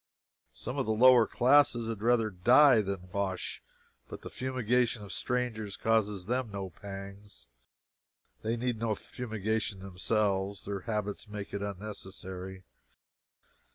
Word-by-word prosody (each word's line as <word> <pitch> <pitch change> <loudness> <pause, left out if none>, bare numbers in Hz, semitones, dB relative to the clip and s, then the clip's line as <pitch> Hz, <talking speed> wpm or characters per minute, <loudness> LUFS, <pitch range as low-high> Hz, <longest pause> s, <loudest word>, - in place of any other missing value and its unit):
Some - - -5
of - - -1
the 110 - +2
lower 125 0 +7
classes 125 -2 +4
had 115 -3 -4
rather 115 -1 +3
die 120 +7 +6
than 95 -3 -5
wash, 95 -2 -2 0.5
but - - -9
the - - -7
fumigation 125 -3 0
of 100 - -8
strangers 115 -5 -2
causes 105 -4 +1
them 125 +2 -1
no 95 -2 -5
pangs. 100 +2 -10 1.0
They 115 +2 -1
need 120 -1 -1
no 110 -1 0
fumigation 110 -3 -3
themselves. 95 +1 -1
Their 100 -1 -3
habits 105 0 -2
make 105 -1 -7
it 100 - -3
unnecessary. 95 -2 -6
105 Hz, 125 wpm, -30 LUFS, 100-115 Hz, 1.0 s, lower